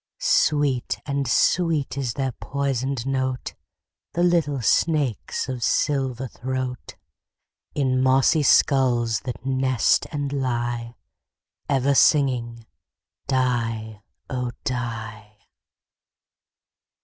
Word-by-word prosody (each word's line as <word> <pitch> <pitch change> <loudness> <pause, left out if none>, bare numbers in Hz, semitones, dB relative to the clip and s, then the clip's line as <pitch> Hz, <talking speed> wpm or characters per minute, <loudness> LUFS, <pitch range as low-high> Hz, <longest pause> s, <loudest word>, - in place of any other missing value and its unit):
Sweet 145 - +1
and 140 -2 -2
sweet 160 +1 +2
is 130 -4 -2
their 135 -2 -1
poisoned 135 -1 -2
note, 130 -1 -2 0.6
The 175 - +1
little 165 -6 +2
snakes' 140 0 0
of 130 -2 -4
silver 130 -2 0
throat, 130 +1 -5 0.8
In 130 -3 +1
mossy 135 +4 +4
skulls 120 -5 +3
that 125 0 -6
nest 130 -2 +2
and 145 -2 -3
lie, 120 -3 -2 0.7
Ever 140 0 +2
singing 125 -6 +2 0.6
"die, 115 -5 -1 0.3
oh! 125 -2 -3
die." 110 -4 -5
130 Hz, 90 wpm, -23 LUFS, 120-140 Hz, 0.8 s, mossy